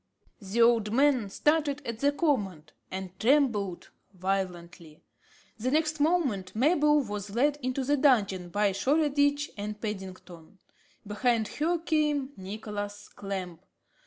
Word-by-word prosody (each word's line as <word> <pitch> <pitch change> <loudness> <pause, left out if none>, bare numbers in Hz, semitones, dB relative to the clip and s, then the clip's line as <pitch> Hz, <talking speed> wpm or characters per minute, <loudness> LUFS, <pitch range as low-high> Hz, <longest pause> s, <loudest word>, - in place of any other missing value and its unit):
The 205 +4 +2
old 230 -3 +3
man 260 -4 +3
started 295 +3 +1
at 230 -1 -5
the 285 +2 +3
command, 210 - -1 0.2
and 190 -1 -5
trembled 225 -8 +1 0.2
violently. 175 -4 -4 0.6
The 245 +4 -1
next 310 +2 +1
moment, 270 - 0
Mabel 295 +3 +3
was 205 -3 -5
led 290 +4 +2
into 255 +1 -2
the 290 +3 +1
dungeon 200 -10 +2
by 205 +2 +1
Shoreditch 285 +5 +1
and 210 +1 -5
Paddington. 190 -4 -8 0.5
Behind 220 +1 0
her 335 +4 0
came 300 -4 0
Nicholas 205 +1 -6
Clamp. 190 -4 -6
225 Hz, 120 wpm, -28 LUFS, 195-285 Hz, 0.6 s, old